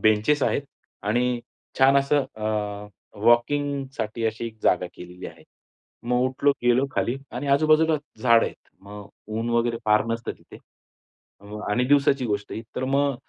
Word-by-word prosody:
Benches 110 +7 +3
आहेत 140 - +1 0.4
आणि 120 +3 0 0.4
छान 135 +1 +6
असं 140 0 +2
अ, 110 - -6 0.8
वॉकिंगसाठी 130 -1 +1
अशी 110 +1 -3
एक 110 -1 -10
जागा 90 0 +2
केलेली 90 +1 -10
आहे. - - -13 0.6
मग 125 +1 0
उठलो, 135 +2 +2
गेलो 120 +3 +3
खाली 125 0 0 0.2
आणि 130 +4 -4
आजूबाजूला 155 +3 +4 0.3
झाडं 115 -2 +5
आहेत. - - -11
मग 100 0 -10 0.3
ऊन 115 +1 -2
वगैरे 115 0 +1
फार 105 0 +3
नसतं 115 0 -3
तिथे. - - -15 0.8
अ, - - -19 0.3
आणि 125 +4 +2
दिवसाची 140 -2 +3
गोष्ट 105 -2 -3
ही. 110 - -5
तर 130 - -1
मग 140 +1 +1
120 Hz, 150 wpm, -24 LUFS, 110-140 Hz, 0.8 s, छान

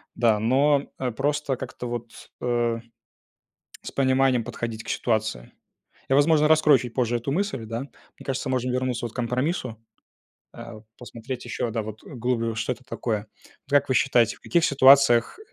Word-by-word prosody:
Да, 115 -3 +3
но, 140 +5 +2
э, 130 -2 -1
просто, 145 +2 -1
как-то 130 -1 -7
вот, 120 -1 -8
э, 120 -1 0 1.1
с - - -7
пониманием 130 -2 +2
подходить 115 -1 -5
к - - -13
ситуации. 110 - -2 0.6
Я, 135 - +4
возможно, 150 +1 +4
раскрою 155 -3 +5
чуть 120 -1 -7
позже 120 -2 +1
эту 120 +4 -3
мысль, 180 - -2
да? 115 +1 -4
Мне 140 - -14
кажется, 135 +1 -2
можно 130 -1 -1
вернуться 125 -1 -1
вот 115 - -9
к - - -14
компромиссу, 125 - -2 0.8
э, 115 0 -9
вот 110 0 -14
посмотреть 125 +1 -7
ещё, 120 0 -3
да, 115 0 -2
вот, 110 0 -9
вглубь, 120 -3 -2
что 115 +3 -1
это 125 +1 -11
такое. 110 -4 -3 0.4
Вот - - -18
как 145 0 +3
вы 130 - +1
считаете, 120 -2 +3
в - - -25
каких 170 -2 +1
ситуациях 135 -3 +5
125 Hz, 170 wpm, -25 LUFS, 115-135 Hz, 1.1 s, раскрою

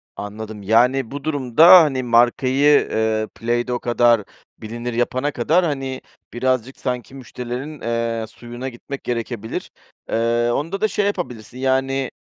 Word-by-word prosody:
Anladım, 105 0 -7
yani, 120 +4 +2
bu 140 0 -6
durumda, 155 +5 +7
hani, 135 -4 -1
markayı, 130 +4 +3
ııı, 110 0 0
Play-Dough 120 +1 -1
kadar 120 -2 +3 0.3
bilinir 120 +2 -6
yapana 130 +4 0
kadar, 160 +10 +2
hani, 135 -4 -3 0.3
birazcık 130 +1 -1
sanki 125 0 -4
müşterilerin, 125 +3 -7
eee, 115 -1 -2
suyuna 120 +3 -8
gitmek 135 +3 -8
gerekebilir. 115 -2 -4 0.4
Iıı, 120 +1 +1
onda 170 - -3
da 215 - +3
şey 205 0 -1
yapabilirsin: 125 - -4
Yani, 135 0 0
125 Hz, 125 wpm, -21 LUFS, 115-135 Hz, 0.4 s, durumda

